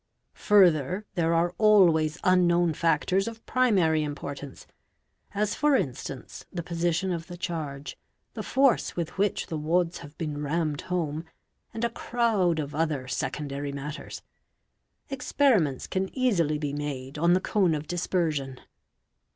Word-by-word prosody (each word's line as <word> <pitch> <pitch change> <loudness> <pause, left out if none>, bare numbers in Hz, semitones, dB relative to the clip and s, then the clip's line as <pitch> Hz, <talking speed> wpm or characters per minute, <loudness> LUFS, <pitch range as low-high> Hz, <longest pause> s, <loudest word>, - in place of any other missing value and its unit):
Further 185 -1 +4
there 170 -2 +1
are 170 +1 +1
always 170 -8 +5
unknown 175 -2 +3
factors 170 +5 +1
of 225 -1 -8
primary 190 -11 +3
import 145 -1 -5
ance, 140 -2 -10 0.7
as 210 0 0
for 295 -1 +3
instance 135 - -4
the 170 -2 -4
position 175 +2 -1
of 165 -1 -4
the 175 - -8
charge, 150 -5 -5 0.4
the - - -5
force 270 -3 +2
with 170 -2 -4
which 200 -1 +1
the 160 - -4
wads 170 +3 0
have 145 +2 -12
been 150 -2 -4
rammed 150 0 -1
home, 165 -4 -2 0.5
and 225 - -5
a 235 - +2
crowd 225 -9 +1
of 150 -1 -3
other 150 -4 -1
secondary 140 +2 -3
matters. 145 +3 -7 0.9
Experiments 245 - +2
can 190 0 -2
easily 175 - +2
be 145 -2 -3
made 145 -1 -5
on 170 +2 +4
the 185 - +4
cone 185 -4 +1
of 150 0 -4
dispersion. 155 -6 -1
165 Hz, 140 wpm, -27 LUFS, 150-185 Hz, 0.9 s, always